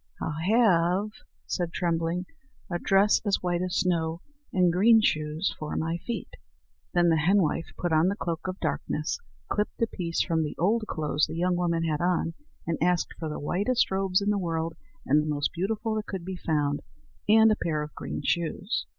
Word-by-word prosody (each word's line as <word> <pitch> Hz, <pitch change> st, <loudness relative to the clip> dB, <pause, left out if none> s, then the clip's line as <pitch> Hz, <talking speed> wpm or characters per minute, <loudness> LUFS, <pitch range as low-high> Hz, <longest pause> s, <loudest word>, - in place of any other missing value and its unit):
"I'll 155 Hz, -, -2 dB, 0.2 s
have," 190 Hz, -2 st, +3 dB, 0.3 s
said 175 Hz, -2 st, -2 dB
Trembling, 170 Hz, +1 st, -1 dB, 0.5 s
"a 175 Hz, -, -1 dB
dress 195 Hz, +3 st, +4 dB
as 205 Hz, -3 st, 0 dB
white 175 Hz, -1 st, 0 dB
as 185 Hz, 0 st, -2 dB
snow, 165 Hz, -2 st, 0 dB, 0.3 s
and 180 Hz, -3 st, +3 dB
green 220 Hz, +5 st, +6 dB
shoes 155 Hz, -3 st, 0 dB
for 155 Hz, -1 st, -4 dB
my 165 Hz, +1 st, -1 dB
feet." 235 Hz, +6 st, -5 dB, 0.6 s
Then 175 Hz, -1 st, +3 dB
the 165 Hz, -, +4 dB
henwife 165 Hz, 0 st, +2 dB
put 175 Hz, -2 st, -1 dB
on 160 Hz, +3 st, +4 dB
the 195 Hz, -, +1 dB
cloak 170 Hz, -4 st, -4 dB
of 185 Hz, +1 st, -4 dB
darkness, -, -, -2 dB, 0.3 s
clipped 210 Hz, 0 st, -2 dB
a 230 Hz, -, +3 dB
piece 170 Hz, -6 st, -3 dB
from 165 Hz, -2 st, 0 dB
the 150 Hz, -, -4 dB
old 215 Hz, +6 st, +2 dB
clothes 150 Hz, -1 st, 0 dB
the -, -, -6 dB
young 180 Hz, +1 st, +1 dB
woman 170 Hz, -2 st, 0 dB
had 155 Hz, -2 st, -1 dB
on, 175 Hz, -1 st, +1 dB, 0.3 s
and 165 Hz, -1 st, -2 dB
asked 175 Hz, 0 st, +1 dB
for 160 Hz, -, -3 dB
the 150 Hz, -, -4 dB
whitest 205 Hz, -, +1 dB
robes 190 Hz, 0 st, +1 dB
in 205 Hz, +1 st, +1 dB
the 205 Hz, -, +1 dB
world 165 Hz, -2 st, -2 dB, 0.3 s
and 150 Hz, +3 st, +4 dB
the 155 Hz, -, -4 dB
most 145 Hz, -1 st, 0 dB
beautiful 215 Hz, +5 st, -1 dB
that 215 Hz, 0 st, -3 dB
could 190 Hz, -4 st, -5 dB
be 190 Hz, 0 st, -4 dB
found, 145 Hz, -4 st, 0 dB, 0.5 s
and 220 Hz, +1 st, +7 dB
a -, -, +3 dB
pair 155 Hz, -5 st, -1 dB
of 150 Hz, -, -8 dB
green -, -, -5 dB
shoes. 175 Hz, +6 st, -1 dB
175 Hz, 190 wpm, -27 LUFS, 165-195 Hz, 0.6 s, and